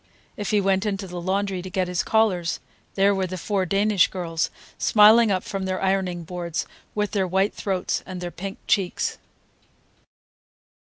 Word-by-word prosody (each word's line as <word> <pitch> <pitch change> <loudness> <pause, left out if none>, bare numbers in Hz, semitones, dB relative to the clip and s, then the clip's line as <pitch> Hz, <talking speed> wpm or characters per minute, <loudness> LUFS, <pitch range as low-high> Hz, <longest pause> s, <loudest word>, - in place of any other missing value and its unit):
If 205 -4 -4
he 210 - +3
went 195 +1 +1
into 195 -1 -2
the 180 -1 -6
laundry 190 +1 -1
to 185 - -7
get 185 0 -1
his 180 -1 0
collars, 195 -6 +1 0.4
there 200 +1 +4
were 190 -1 -1
the 185 +1 -5
four 190 +1 -1
Danish 200 +1 +3
girls, 165 -3 -2 0.3
smiling 220 +2 +6
up 190 -2 0
from 195 -1 -4
their 185 0 -2
ironing 190 -3 0
boards, 170 0 -4 0.3
with 210 -1 0
their 195 -3 0
white 190 +3 +1
throats 190 -3 -2
and 185 -1 -7
their 175 -1 -5
pink 195 +3 -6
cheeks. 190 -3 0
190 Hz, 165 wpm, -24 LUFS, 180-200 Hz, 0.4 s, smiling